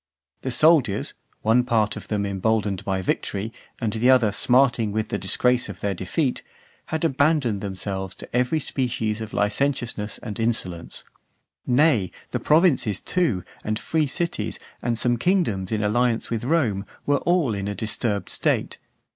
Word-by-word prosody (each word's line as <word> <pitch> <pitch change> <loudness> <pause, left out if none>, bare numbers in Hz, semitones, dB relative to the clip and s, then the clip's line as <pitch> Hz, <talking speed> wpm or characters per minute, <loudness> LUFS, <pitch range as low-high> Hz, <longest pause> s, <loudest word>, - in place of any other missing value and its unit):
The 130 - -3
soldiers, 130 -6 +3 0.3
one 115 +3 +4
part 110 -3 +1
of - - -8
them 105 -2 -1
emboldened 100 0 0
by 95 -1 -1
victory, 100 +4 -2 0.3
and 110 -4 -1
the 115 +3 +2
other 125 -5 +5
smarting 120 -1 +3
with 110 +1 -2
the 100 - -2
disgrace 125 +5 +1
of 95 - -8
their 100 -1 -1
defeat, 125 - -1 0.5
had 160 +1 -1
abandoned 140 -7 +2
themselves 95 -1 -4
to - - -9
every 125 +6 +2
species 115 -6 -2
of 110 -1 -6
licentiousness 110 0 -1
and 105 -3 -6
insolence. 95 -7 -2 0.6
Nay, 125 - +3 0.2
the - - -1
provinces, 150 - +3
too, 145 - 0 0.2
and 110 0 -1
free 155 +5 0
cities, 170 +5 -2 0.2
and 120 -1 -1
some 120 +1 +2
kingdoms 115 - +1
in 110 -1 0
alliance 115 +3 +1
with 115 0 -2
Rome, 120 -10 +1 0.2
were 145 0 +3
all 175 -9 +2
in 100 -1 -3
a 105 - -3
disturbed 110 -1 -1
state. - - 0
115 Hz, 155 wpm, -24 LUFS, 105-130 Hz, 0.6 s, other